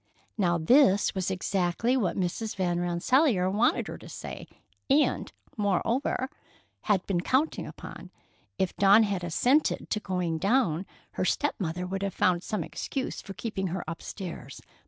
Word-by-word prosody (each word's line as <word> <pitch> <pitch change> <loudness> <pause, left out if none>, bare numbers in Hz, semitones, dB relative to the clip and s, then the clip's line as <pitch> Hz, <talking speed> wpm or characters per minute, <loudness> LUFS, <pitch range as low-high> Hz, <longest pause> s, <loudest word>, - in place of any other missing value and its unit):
Now, 175 -5 +2
this 205 - +4
was 190 -2 -1
exactly 190 +5 0
what 215 -9 0
Mrs. 195 +4 -2
Van 175 -2 0
Rensselaer 185 - +2
wanted 220 +5 +2
her - - -7
to - - -12
say, - - -7 0.4
and, 290 +3 +2 0.3
moreover, 225 +7 0 0.6
had 200 -4 +2
been 180 -3 0
counting 265 - 0
upon. - - -10 0.5
If 190 -2 -1
Dawn 200 +3 +6
had 200 -4 -1
assented 250 - +1
to 210 - +1
going 180 -5 -2
down, 195 -4 +1 0.2
her - - -2
step 290 +9 +1
mother 180 -1 -2
would 190 +1 -4
have 200 -2 -2
found 180 -2 +2
some 210 +2 -3
excuse 265 -2 -4
for 195 - -9
keeping 195 -2 -3
her 175 +1 -3
upstairs. 165 -3 -7
195 Hz, 150 wpm, -28 LUFS, 175-225 Hz, 0.6 s, Dawn